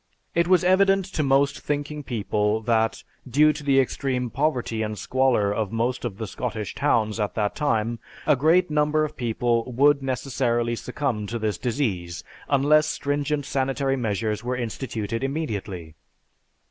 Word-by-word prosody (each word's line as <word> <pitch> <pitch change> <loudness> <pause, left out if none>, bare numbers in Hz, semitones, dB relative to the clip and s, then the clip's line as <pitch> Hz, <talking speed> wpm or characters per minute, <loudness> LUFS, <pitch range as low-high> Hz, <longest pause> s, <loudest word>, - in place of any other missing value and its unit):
It 170 0 +2
was 185 -1 +4
evident 195 +1 +4
to - - 0
most 140 0 +2
thinking 150 +1 -3
people 105 -4 -1
that, 110 -1 +1 0.3
due 150 +5 +5
to 150 - -8
the 135 -1 +4
extreme 125 -2 -1
poverty 130 -6 -1
and 105 -1 -3
squalor 120 -2 +1
of 105 -1 -2
most 120 +3 -1
of 105 -5 -4
the 110 - -4
Scottish 110 0 -4
towns 115 -6 +1
at 105 -3 -2
that 105 -2 -1
time, 115 -6 0 0.3
a 150 - +5
great 160 +5 +3
number 150 +1 +2
of 150 - -8
people 120 0 0
would 140 +3 +4
necessarily 125 -3 -1
succumb 125 -4 -3
to 115 - -3
this 110 -2 -2
disease 95 - -2 0.3
unless 150 +2 +4
stringent 145 0 -1
sanitary 135 0 0
measures 110 -2 -2
were 125 +1 -2
instituted 115 -1 -4
immediately. 105 - -4
125 Hz, 150 wpm, -24 LUFS, 110-145 Hz, 0.3 s, due